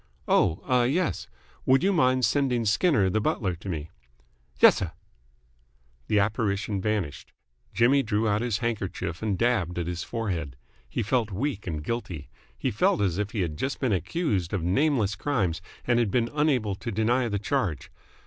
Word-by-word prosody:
"Oh, 80 Hz, -, +2 dB
ah, 125 Hz, -1 st, +3 dB
yes. 150 Hz, +8 st, 0 dB, 0.4 s
Would 135 Hz, +4 st, +5 dB
you 195 Hz, +1 st, +3 dB
mind 130 Hz, -6 st, +3 dB
sending 130 Hz, -5 st, +1 dB
Skinner 105 Hz, -, +3 dB
the 110 Hz, +4 st, +1 dB
butler 95 Hz, -2 st, 0 dB
to 95 Hz, -, -8 dB
me." 80 Hz, -1 st, -4 dB, 0.7 s
"Y's'r." 90 Hz, -4 st, +5 dB, 1.1 s
The 105 Hz, -, +2 dB
apparition 100 Hz, -1 st, 0 dB
vanished. 100 Hz, -8 st, -2 dB, 0.4 s
Jimmy 130 Hz, +4 st, +4 dB
drew 110 Hz, -2 st, 0 dB
out 105 Hz, 0 st, +1 dB
his 120 Hz, -4 st, 0 dB
handkerchief 95 Hz, -6 st, -3 dB
and 105 Hz, -4 st, -1 dB
dabbed 100 Hz, -7 st, +1 dB
at 85 Hz, -, -1 dB
his 85 Hz, 0 st, -3 dB
forehead. 90 Hz, -, -3 dB, 0.3 s
He 115 Hz, -, -2 dB
felt 115 Hz, 0 st, +1 dB
weak 105 Hz, +1 st, -3 dB
and 75 Hz, -4 st, -3 dB
guilty. 90 Hz, -8 st, -4 dB, 0.3 s
He -, -, -1 dB
felt -, -, +2 dB
as 95 Hz, -2 st, 0 dB
if 105 Hz, -1 st, -1 dB
he 105 Hz, -2 st, -2 dB
had 80 Hz, -4 st, -2 dB
just 135 Hz, -, -2 dB
been 125 Hz, -6 st, +1 dB
accused 95 Hz, -, -1 dB
of 95 Hz, -5 st, -1 dB
nameless 110 Hz, -, +2 dB
crimes 95 Hz, -, -1 dB, 0.2 s
and 120 Hz, -1 st, +3 dB
had 115 Hz, -4 st, +2 dB
been 115 Hz, +3 st, 0 dB
unable 135 Hz, -9 st, +1 dB
to 115 Hz, +5 st, -5 dB
deny 120 Hz, +4 st, +1 dB
the 100 Hz, -, -1 dB
charge. 105 Hz, -, -2 dB
105 Hz, 170 wpm, -26 LUFS, 95-125 Hz, 1.1 s, Would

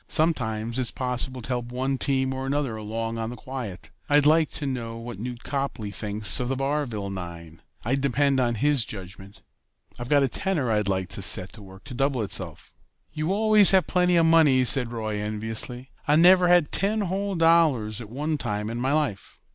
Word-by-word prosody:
Sometimes 120 Hz, -7 st, 0 dB
it's 125 Hz, -3 st, -1 dB
possible 125 Hz, 0 st, -3 dB
to -, -, -9 dB
help 120 Hz, -2 st, -3 dB
one 130 Hz, +1 st, -2 dB
team 130 Hz, -1 st, 0 dB
or 130 Hz, 0 st, -5 dB
another 140 Hz, -4 st, -2 dB
along 115 Hz, +1 st, -5 dB
on 110 Hz, 0 st, -3 dB
the 120 Hz, -, -7 dB
quiet. 120 Hz, -10 st, -8 dB, 0.2 s
I'd 145 Hz, 0 st, +4 dB
like 155 Hz, +1 st, +4 dB
to 150 Hz, -, -4 dB
know 120 Hz, -4 st, -4 dB
what 115 Hz, -3 st, -8 dB
Newt 120 Hz, +1 st, -7 dB
Copley 135 Hz, -7 st, -4 dB
thinks 105 Hz, 0 st, 0 dB
of 125 Hz, -, -2 dB
the 135 Hz, -, -1 dB
Barville 135 Hz, -7 st, -3 dB
nine. 85 Hz, -3 st, -9 dB, 0.2 s
I'd 135 Hz, +4 st, 0 dB
depend 140 Hz, +1 st, +1 dB
on 120 Hz, -2 st, 0 dB
his 140 Hz, +1 st, +1 dB
judgment. 95 Hz, -1 st, -11 dB, 0.6 s
I've 120 Hz, +1 st, -7 dB
got 145 Hz, -1 st, +4 dB
a -, -, +2 dB
tenner 150 Hz, -, 0 dB
I'd 105 Hz, -2 st, 0 dB
like 95 Hz, -2 st, -2 dB
to -, -, -4 dB
set 90 Hz, 0 st, +3 dB
to 110 Hz, -, -12 dB
work 95 Hz, 0 st, -14 dB
to -, -, -10 dB
double 135 Hz, -2 st, -1 dB
itself." 100 Hz, -, -2 dB, 0.4 s
"You 155 Hz, +3 st, -2 dB
always 215 Hz, 0 st, +4 dB
have 190 Hz, -2 st, +4 dB
plenty 180 Hz, -1 st, +1 dB
of 165 Hz, -1 st, +4 dB
money," 155 Hz, -6 st, +4 dB
said 125 Hz, -2 st, +6 dB
Roy 110 Hz, -3 st, -4 dB
enviously. 110 Hz, +4 st, -2 dB, 0.2 s
"I 145 Hz, -, +4 dB
never 180 Hz, +2 st, +6 dB
had 175 Hz, -4 st, +3 dB
ten 210 Hz, +2 st, +1 dB
whole 195 Hz, +1 st, -2 dB
dollars 160 Hz, -, +2 dB
at 110 Hz, -, -10 dB
one 150 Hz, +5 st, -3 dB
time 105 Hz, -1 st, -3 dB
in 120 Hz, -, -5 dB
my 130 Hz, +3 st, 0 dB
life." 150 Hz, -10 st, -3 dB
130 Hz, 195 wpm, -24 LUFS, 110-150 Hz, 0.6 s, said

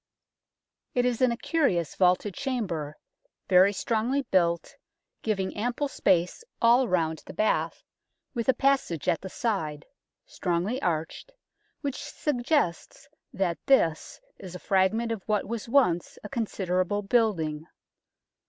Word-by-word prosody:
It 245 Hz, 0 st, +2 dB
is 245 Hz, -1 st, 0 dB
in 255 Hz, -1 st, +4 dB
a 235 Hz, -, -2 dB
curious 230 Hz, -, 0 dB
vaulted 185 Hz, +2 st, +2 dB
chamber, 180 Hz, -, -3 dB, 0.5 s
very 185 Hz, +1 st, +6 dB
strongly 235 Hz, +7 st, 0 dB
built, 170 Hz, -7 st, 0 dB, 0.5 s
giving 195 Hz, -4 st, -2 dB
ample 245 Hz, +6 st, -1 dB
space 180 Hz, -, +1 dB, 0.2 s
all 240 Hz, +2 st, +5 dB
round 160 Hz, -4 st, 0 dB
the -, -, -9 dB
bath, 215 Hz, -, 0 dB, 0.5 s
with 235 Hz, -1 st, -2 dB
a -, -, +7 dB
passage 270 Hz, -, +1 dB
at 165 Hz, -, +2 dB
the 190 Hz, -, -7 dB
side, 180 Hz, -, -2 dB, 0.4 s
strongly 185 Hz, +8 st, -2 dB
arched, 165 Hz, -, -2 dB, 0.5 s
which 285 Hz, -2 st, -4 dB
suggests 275 Hz, -, -1 dB, 0.2 s
that 185 Hz, -3 st, -1 dB
this 165 Hz, -12 st, +2 dB, 0.2 s
is 185 Hz, -2 st, -9 dB
a -, -, -6 dB
fragment 205 Hz, +6 st, +1 dB
of 225 Hz, -3 st, -3 dB
what 210 Hz, -2 st, +1 dB
was 230 Hz, +2 st, -5 dB
once 205 Hz, -11 st, +2 dB
a 210 Hz, -, -7 dB
considerable 195 Hz, -3 st, -1 dB
building. 170 Hz, -9 st, 0 dB
205 Hz, 125 wpm, -27 LUFS, 175-245 Hz, 0.5 s, a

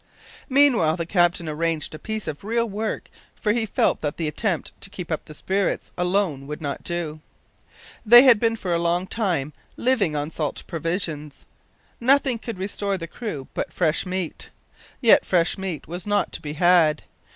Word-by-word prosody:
Meanwhile 255 Hz, -, +4 dB
the 170 Hz, -, -2 dB
captain 175 Hz, -1 st, +2 dB
arranged 160 Hz, 0 st, -2 dB
a 155 Hz, -, -8 dB
piece 220 Hz, +2 st, -4 dB
of 155 Hz, +2 st, -5 dB
real 230 Hz, +3 st, 0 dB
work, 215 Hz, +1 st, -3 dB, 0.3 s
for 210 Hz, -2 st, 0 dB
he 225 Hz, -1 st, -1 dB
felt -, -, +1 dB
that 145 Hz, -1 st, -3 dB
the 165 Hz, -, -1 dB
attempt 170 Hz, +3 st, -2 dB
to 200 Hz, -, -6 dB
keep 180 Hz, -4 st, -7 dB
up 160 Hz, -, -2 dB
the 155 Hz, -, -10 dB
spirits 195 Hz, +4 st, -1 dB
alone 180 Hz, -6 st, 0 dB
would 150 Hz, +1 st, -5 dB
not 145 Hz, -2 st, -4 dB
do. 170 Hz, -3 st, -3 dB, 0.8 s
They 240 Hz, +3 st, +9 dB
had 250 Hz, -5 st, +7 dB
been 230 Hz, 0 st, +2 dB
for 185 Hz, -6 st, -3 dB
a 170 Hz, -, +1 dB
long 170 Hz, +2 st, +1 dB
time 175 Hz, -9 st, -1 dB, 0.2 s
living 225 Hz, -11 st, +1 dB
on 145 Hz, +2 st, -2 dB
salt 150 Hz, -3 st, -3 dB
provisions. 160 Hz, -3 st, -4 dB, 0.5 s
Nothing 260 Hz, -1 st, +3 dB
could 225 Hz, -3 st, -6 dB
restore 200 Hz, +1 st, -2 dB
the 165 Hz, -, -5 dB
crew 165 Hz, -, -6 dB
but -, -, -3 dB
fresh 165 Hz, -3 st, +1 dB
meat 185 Hz, -3 st, -4 dB, 0.5 s
yet 235 Hz, -4 st, +6 dB
fresh 175 Hz, -2 st, +2 dB
meat 190 Hz, -7 st, -5 dB
was 175 Hz, +4 st, -6 dB
not 205 Hz, 0 st, +1 dB
to -, -, -6 dB
be 150 Hz, -1 st, -5 dB
had. 165 Hz, -2 st, +4 dB
180 Hz, 175 wpm, -23 LUFS, 155-210 Hz, 0.8 s, They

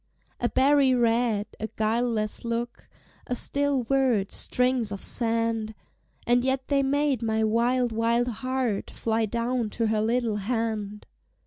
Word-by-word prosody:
A 240 Hz, -, 0 dB
berry 275 Hz, -1 st, +4 dB
red, 230 Hz, -3 st, +1 dB
a 220 Hz, -, -3 dB
guileless 220 Hz, -1 st, 0 dB
look, 235 Hz, +1 st, -4 dB, 0.4 s
A 245 Hz, -, -1 dB
still 280 Hz, 0 st, +1 dB
word, 245 Hz, -6 st, +1 dB
strings 250 Hz, -3 st, 0 dB
of 200 Hz, -, -4 dB
sand! 230 Hz, -1 st, -1 dB, 0.5 s
And 245 Hz, +1 st, +3 dB
yet 265 Hz, 0 st, -1 dB
they 280 Hz, -1 st, +3 dB
made 280 Hz, -1 st, +1 dB
my 220 Hz, -1 st, 0 dB
wild, 240 Hz, +3 st, +1 dB
wild 230 Hz, +2 st, +1 dB
heart 250 Hz, -2 st, -2 dB
Fly 225 Hz, -1 st, -1 dB
down 235 Hz, +1 st, -1 dB
to 230 Hz, +2 st, -2 dB
her 215 Hz, -1 st, +1 dB
little 230 Hz, -1 st, 0 dB
hand. 210 Hz, -1 st, -3 dB
235 Hz, 135 wpm, -26 LUFS, 220-255 Hz, 0.5 s, berry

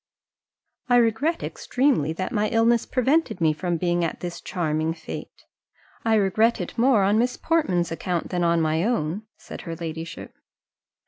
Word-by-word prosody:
"I 245 Hz, -, +5 dB
regret 245 Hz, +8 st, +2 dB
extremely 250 Hz, -, 0 dB
that 185 Hz, +5 st, -4 dB
my 215 Hz, -3 st, +1 dB
illness 230 Hz, 0 st, +2 dB
prevented 270 Hz, -, +1 dB
me 160 Hz, -2 st, +3 dB
from 175 Hz, +2 st, -2 dB
being 175 Hz, 0 st, 0 dB
at 165 Hz, -, -2 dB
this 175 Hz, -1 st, -6 dB
charming 160 Hz, -2 st, -1 dB
fête; 160 Hz, -1 st, -7 dB, 0.7 s
I 225 Hz, -1 st, +3 dB
regret 215 Hz, +3 st, +2 dB
it -, -, -5 dB
more 235 Hz, -3 st, +4 dB
on 205 Hz, +3 st, +3 dB
Miss 245 Hz, +1 st, 0 dB
Portman's 185 Hz, -, +1 dB
account 170 Hz, +1 st, -2 dB
than 175 Hz, -1 st, -1 dB
on 170 Hz, -1 st, +3 dB
my 160 Hz, +1 st, +1 dB
own," 210 Hz, -2 st, -1 dB
said -, -, -9 dB
her 165 Hz, -1 st, -6 dB
ladyship. 165 Hz, 0 st, -7 dB
185 Hz, 155 wpm, -24 LUFS, 165-235 Hz, 0.7 s, I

